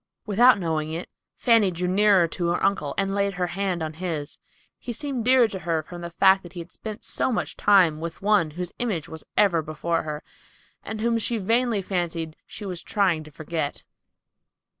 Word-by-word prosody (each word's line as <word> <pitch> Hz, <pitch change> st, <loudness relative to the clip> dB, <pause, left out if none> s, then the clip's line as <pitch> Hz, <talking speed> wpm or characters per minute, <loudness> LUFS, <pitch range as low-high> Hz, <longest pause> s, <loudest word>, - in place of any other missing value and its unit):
Without 235 Hz, +4 st, +5 dB
knowing 160 Hz, -4 st, -2 dB
it, 165 Hz, +2 st, -5 dB, 0.3 s
Fanny 230 Hz, -5 st, +4 dB
drew 180 Hz, 0 st, -2 dB
nearer 195 Hz, -2 st, +4 dB
to 170 Hz, +1 st, -3 dB
her 170 Hz, -, 0 dB
uncle 185 Hz, -8 st, 0 dB
and 195 Hz, 0 st, 0 dB
laid 200 Hz, -1 st, 0 dB
her 180 Hz, 0 st, 0 dB
hand 180 Hz, -1 st, -2 dB
on 155 Hz, 0 st, -4 dB
his. 160 Hz, -3 st, -5 dB, 0.4 s
He 240 Hz, -, -5 dB
seemed 270 Hz, -1 st, -3 dB
dearer 255 Hz, -2 st, +6 dB
to 190 Hz, -, -5 dB
her 165 Hz, -2 st, -1 dB
from 175 Hz, +2 st, -9 dB
the 170 Hz, -, -5 dB
fact 190 Hz, +3 st, +4 dB
that 175 Hz, -1 st, -13 dB
he 175 Hz, -, -7 dB
had 170 Hz, +1 st, -9 dB
spent 215 Hz, -1 st, -8 dB
so -, -, +1 dB
much 225 Hz, -, -2 dB
time 185 Hz, -7 st, +4 dB
with 170 Hz, 0 st, -5 dB
one 200 Hz, -5 st, +3 dB
whose 180 Hz, -1 st, -4 dB
image 205 Hz, -10 st, -2 dB
was 160 Hz, -1 st, -9 dB
ever 190 Hz, -6 st, +4 dB
before 155 Hz, +2 st, -2 dB
her, 150 Hz, -1 st, -5 dB, 0.6 s
and 215 Hz, -1 st, -5 dB
whom 230 Hz, 0 st, +1 dB
she 230 Hz, +1 st, 0 dB
vainly 225 Hz, 0 st, +1 dB
fancied 170 Hz, -4 st, -2 dB
she 210 Hz, -, -8 dB
was 180 Hz, -3 st, -4 dB
trying 185 Hz, -7 st, +1 dB
to -, -, -11 dB
forget. 155 Hz, -1 st, -4 dB
180 Hz, 195 wpm, -25 LUFS, 165-210 Hz, 0.6 s, dearer